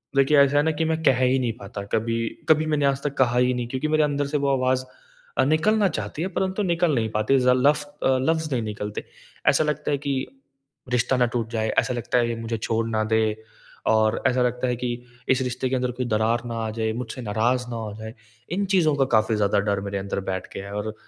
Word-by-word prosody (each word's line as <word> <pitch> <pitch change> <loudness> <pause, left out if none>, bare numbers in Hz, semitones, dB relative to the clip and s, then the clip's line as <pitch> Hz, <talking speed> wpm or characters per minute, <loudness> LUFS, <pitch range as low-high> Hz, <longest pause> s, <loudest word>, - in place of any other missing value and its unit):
देखिए 140 +2 +4
ऐसा 140 +1 +4
है 145 - +4
ना 160 - +2
कि 160 +1 -1
मैं 160 0 -1
कह 130 -4 +4
ही 130 +1 +3
नहीं 120 -3 -1
पाता 100 0 -7
कभी। 105 +2 0 0.3
कभी - - -18
कभी 155 0 +5
मैंने 145 -2 +2
आज 140 0 +1
तक 145 - -2
कहा 125 -2 +3
ही 125 0 +3
नहीं 125 -1 -3
क्योंकि 130 +5 -2
मेरे 155 0 +3
अंदर 145 -1 0
से 150 +1 -1
वो 140 0 0
आवाज़ 130 0 +1 0.5
अ, - - +4
निकलना 200 +8 +3
चाहती 110 +2 -4
है 180 - 0
परंतु 190 +2 0
निकल 170 -3 +1
नहीं 110 -2 0
पाती, 110 +5 +2
ज़ 125 0 +2
लफ 145 +3 +3 0.2
अ, 130 0 +3
लफ़्ज़ 160 +2 0
नहीं 125 - 0
निकलते। 105 -1 -5 0.5
ऐसा - - +3
लगता 150 -1 -1
है 145 - +2
कि 140 0 -2 0.8
रिश्ता 125 +1 +2
ना 125 - +4
टूट 115 -2 -1
जाए, 110 -1 -1
ऐसा 125 - -1
लगता 120 +1 -1
है 120 - +2
ये 115 - -2
मुझे 115 0 -3
छोड़ 115 +1 -1
ना 110 -1 0
दे 110 0 +4 0.7
और 110 0 +3
ऐसा 130 -1 +1
लगता 125 +1 0
है 125 - 0
कि 125 +1 -2 0.4
इस 130 0 +3
रिश्ते 125 +1 -2
के 130 - 0
अंदर 125 -1 0
कोई 125 0 -3
दरार 115 +2 +1
ना 115 -1 -4
आ - - -2
जाए, 110 0 -1
मुझसे 125 +1 -5
नाराज़ 120 +3 0
ना 120 - -4
हो 110 -2 -5
जाएँ। 110 0 -7 0.4
इन 195 +3 0
चीज़ों 155 -5 +3
का 135 -1 +2
काफ़ी 110 +1 +1
ज़्यादा 100 -1 +2
डर 100 - 0
मेरे 100 - -3
अंदर 100 0 -3
बैठ 95 - -4
गया 95 - -5
है 100 - -8
और 105 +1 -3
125 Hz, 245 wpm, -24 LUFS, 110-145 Hz, 0.8 s, कभी